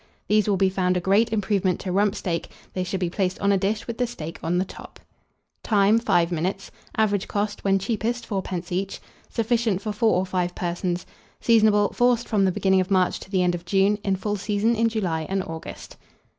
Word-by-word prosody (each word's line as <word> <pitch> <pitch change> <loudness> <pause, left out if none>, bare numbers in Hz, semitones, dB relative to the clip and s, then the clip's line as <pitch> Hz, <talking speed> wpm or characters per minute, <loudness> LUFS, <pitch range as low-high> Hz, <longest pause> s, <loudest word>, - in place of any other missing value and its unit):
These 210 -1 +3
will 200 - +2
be 190 0 +3
found 185 -1 +1
a - - +1
great 200 +6 +2
improvement 200 -4 0
to 185 - -3
rump 200 +2 +2
steak: 170 -6 -3 0.2
they 185 - -1
should 185 +1 -3
be 180 - 0
placed 185 -1 -1
on 200 0 +1
a - - +4
dish 205 +2 -1
with 235 0 -6
the 245 - +1
steak 165 -9 -7
on 175 +2 0
the 185 - +1
top. - - -12 0.6
Time. 210 +1 +3
5 175 -7 +2
minutes. 185 +4 -2 0.3
Average 205 -3 +1
cost, 205 0 -2
when 195 -1 +3
cheapest, 230 +3 -2
4d. 185 -4 -4
each. 190 +2 -2 0.3
Sufficient 230 -3 0
for 215 +1 -4
4 220 +1 +2
or 185 +1 +1
5 180 -1 -2
persons. 175 0 -2 0.3
Seasonable. 215 -3 +4
Forced 245 -1 +2
from 205 -3 +2
the 190 - +3
beginning 190 +1 +2
of 185 - -4
March 185 -2 +2
to - - -12
the 190 -2 +1
end 175 0 +2
of 175 -1 -5
June; 195 +3 +2
in 195 -2 +1
full 205 +2 -2
season 205 +3 +1
in 230 +1 +2
July 175 -8 -2
and 195 0 0
August. 160 -2 -8
195 Hz, 210 wpm, -24 LUFS, 180-215 Hz, 0.6 s, a